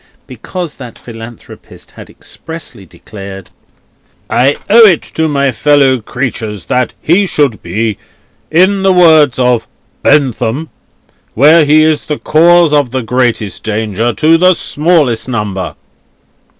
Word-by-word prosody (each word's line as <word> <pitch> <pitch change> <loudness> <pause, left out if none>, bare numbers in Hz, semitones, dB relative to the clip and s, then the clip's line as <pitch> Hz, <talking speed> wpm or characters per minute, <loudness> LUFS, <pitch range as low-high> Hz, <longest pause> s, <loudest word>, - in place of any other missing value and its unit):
Because 180 -4 -7
that 125 -3 -10
Philanthropist 115 -1 -13
had - - -13
expressly 160 - -10
declared: 95 +1 -11 0.8
"I 130 +4 +2
owe 225 +2 +7
it 175 -6 +2
to 160 0 0
my 140 -2 0
fellow 135 +1 +2
creatures 110 -5 -5
that 125 0 -1
he 190 +5 +2
should 140 -10 -1
be, 105 +4 -3 0.5
in 190 +4 +2
the 190 -1 +3
words 160 -7 +4
of 125 -2 0 0.3
BENTHAM, 135 +1 0 0.6
where 155 +6 +5
he 155 +2 +4
is 155 -1 0
the 150 - -3
cause 170 0 +3
of 145 -4 +2
the 130 0 -3
greatest 120 -4 -2
danger 110 +1 -2
to 160 +5 +2
the 185 +1 +4
smallest 150 -9 -1
number." 105 -6 -4
140 Hz, 125 wpm, -11 LUFS, 115-160 Hz, 0.8 s, owe